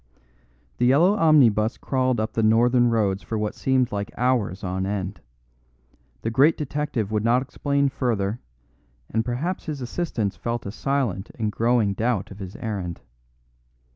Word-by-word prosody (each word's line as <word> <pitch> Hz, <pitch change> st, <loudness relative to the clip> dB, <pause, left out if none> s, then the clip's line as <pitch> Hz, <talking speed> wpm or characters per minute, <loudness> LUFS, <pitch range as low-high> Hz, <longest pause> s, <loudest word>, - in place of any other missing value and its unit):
The 120 Hz, -, +3 dB
yellow 165 Hz, +10 st, +5 dB
omnibus 130 Hz, -, +4 dB
crawled 130 Hz, -3 st, 0 dB
up 110 Hz, +1 st, -2 dB
the 115 Hz, -, 0 dB
northern 120 Hz, +3 st, +4 dB
roads 105 Hz, -4 st, +1 dB
for 110 Hz, -, -4 dB
what 105 Hz, 0 st, -2 dB
seemed 130 Hz, -2 st, +1 dB
like 100 Hz, -1 st, -3 dB
hours 120 Hz, -6 st, 0 dB
on 95 Hz, 0 st, -2 dB
end; 95 Hz, -2 st, -4 dB, 1.0 s
the 115 Hz, -, -1 dB
great 145 Hz, +7 st, +4 dB
detective 145 Hz, -7 st, -2 dB
would 105 Hz, -1 st, 0 dB
not 120 Hz, +3 st, +3 dB
explain 140 Hz, +1 st, 0 dB
further, 115 Hz, -5 st, -1 dB, 0.7 s
and 110 Hz, +1 st, +1 dB
perhaps 135 Hz, +10 st, -3 dB
his 150 Hz, -3 st, -3 dB
assistants 120 Hz, -, -2 dB
felt 120 Hz, 0 st, -4 dB
a 100 Hz, -, -4 dB
silent 115 Hz, -4 st, -1 dB
and 110 Hz, -2 st, -2 dB
growing 115 Hz, -2 st, +2 dB
doubt 110 Hz, -1 st, -1 dB
of 100 Hz, -, -10 dB
his 95 Hz, +1 st, -7 dB
errand. 100 Hz, -7 st, -4 dB
115 Hz, 150 wpm, -24 LUFS, 105-130 Hz, 1.0 s, yellow